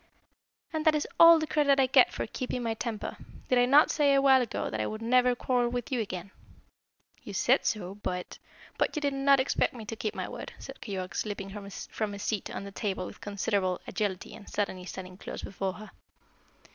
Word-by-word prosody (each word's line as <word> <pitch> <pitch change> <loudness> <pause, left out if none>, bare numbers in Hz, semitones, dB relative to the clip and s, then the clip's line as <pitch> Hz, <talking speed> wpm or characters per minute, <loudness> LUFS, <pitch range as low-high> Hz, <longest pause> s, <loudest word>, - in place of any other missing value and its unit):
"And 315 -1 -1
that 310 -1 +5
is 300 - -1
all 335 0 +10
the 315 - -1
credit 290 -2 +3
I 265 - +6
get 255 - +5
for - - -3
keeping 250 -1 -4
my 230 -1 0
temper! 225 -1 -4 0.3
Did 250 - +4
I 245 - +5
not 285 +4 +6
say 285 -2 +3
a - - +5
while 265 -1 +6
ago 235 - -2
that 110 - -3
I 105 - -1
would 215 +1 -5
never 250 +1 +4
quarrel 245 -1 +1
with 245 0 -4
you 255 - +1
again?" 185 -2 -5 0.9
"You - - -9
said - - +3
so, 195 -4 -2
but 180 -3 -5 0.2
" - - -22
"But - - +1
you - - 0
did 285 -2 0
not 275 0 +4
expect 260 -1 +1
me 225 -3 -8
to 225 - -5
keep 215 -1 -3
my - - -3
word," - - -8
said - - -10
Keyork, 185 -4 -5
slipping 200 -1 -3 0.2
from 205 +1 -4
his 200 0 -6
seat 215 -4 -2
on - - -5
the 200 - -8
table 195 -3 -3
with - - -10
considerable 200 -2 -1
agility 205 +1 -3
and 205 -1 -12
suddenly 190 -3 -2
standing 185 0 -8
close - - -7
before 195 -1 -3
her. 215 +2 -11
220 Hz, 215 wpm, -29 LUFS, 195-260 Hz, 0.9 s, all